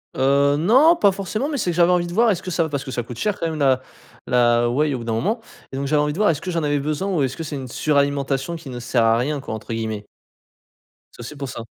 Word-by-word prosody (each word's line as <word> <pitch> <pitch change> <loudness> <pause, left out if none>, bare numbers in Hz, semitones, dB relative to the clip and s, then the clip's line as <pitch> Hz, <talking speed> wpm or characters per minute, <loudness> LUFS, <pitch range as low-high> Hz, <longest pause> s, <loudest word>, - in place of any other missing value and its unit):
Heu, 140 +1 +3
non, 260 - +5
pas 205 - +4
forcément, 205 - -3
mais 295 - -2
c'est 185 -8 0
que - - -5
j'avais 175 +1 +4
envie 175 -1 +1
de 170 - -7
voir 230 +3 +4
est-ce 180 -3 -2
que 185 - -6
ça 170 0 +1
va 160 - -3
parce 140 -2 -3
que 130 - -6
ça 120 -1 -2
coûte 115 0 -9
cher 210 - -1
quand 165 - -1
même, 160 -1 -5
la 130 -2 +3 0.4
la 120 -1 +3
whey 145 +4 +1
au - - -2
bout - - -7
d'un 115 - -1
moment 200 - 0 0.3
et - - -7
donc 140 0 -2
j'avais 150 +1 +2
envie 150 0 0
de - - -8
voir 210 +1 +3
est-ce 155 -3 0
que 185 - -4
j'en 165 -2 -1
avais 145 -1 +1
besoin, 155 +7 -2
ou 155 -6 +1
est-ce 135 0 -2
que 165 - -4
c'est 150 -1 -5
une 135 -2 -6
suralimentation 140 +2 0
qui 160 -4 -9
«ne 125 -1 -6
sert 120 -1 +1
à 115 0 +4
rien 140 +5 -1
quoi», 110 - -6
entre 110 +1 -6
guillemets? 110 -2 -4 1.1
C'est - - -19
aussi 125 +6 -8
pour 140 -2 -6
ça. 125 - -6
145 Hz, 295 wpm, -21 LUFS, 130-175 Hz, 1.1 s, non